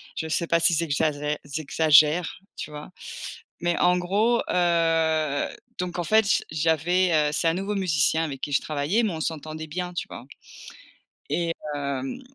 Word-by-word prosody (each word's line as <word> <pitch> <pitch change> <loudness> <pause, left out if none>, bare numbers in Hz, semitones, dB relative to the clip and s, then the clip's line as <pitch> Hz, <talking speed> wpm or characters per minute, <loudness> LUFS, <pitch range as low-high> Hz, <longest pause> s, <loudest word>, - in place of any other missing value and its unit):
je 160 - -3
sais 165 +2 0
pas 170 - +3
si 170 +1 +5
j'exagère 150 -2 0
j'exagère, 155 +3 +3 0.2
tu 150 - -7
vois? 150 +3 -8 0.7
Mais 175 0 0
en 180 0 +4
gros, 210 +7 +1
heu, 165 -4 +1 0.3
donc, 180 -1 -3
en - - 0
fait, 220 +4 +4
j - - +2
j'avais, 165 +4 +2
heu, 150 -1 +3
c'est 165 - +1
un 165 - +3
nouveau 195 +2 -2
musicien 160 -4 +1
avec 140 -4 -6
qui 145 - -4
je - - +3
travaillais 155 +10 0
mais 215 - 0
on 160 - -5
s'entendait 155 0 -4
bien, 180 +3 -4
tu 175 - -4
vois? - - -9 1.0
et 170 -1 0 0.2
hem, 140 - -4
160 Hz, 165 wpm, -25 LUFS, 150-180 Hz, 1.0 s, si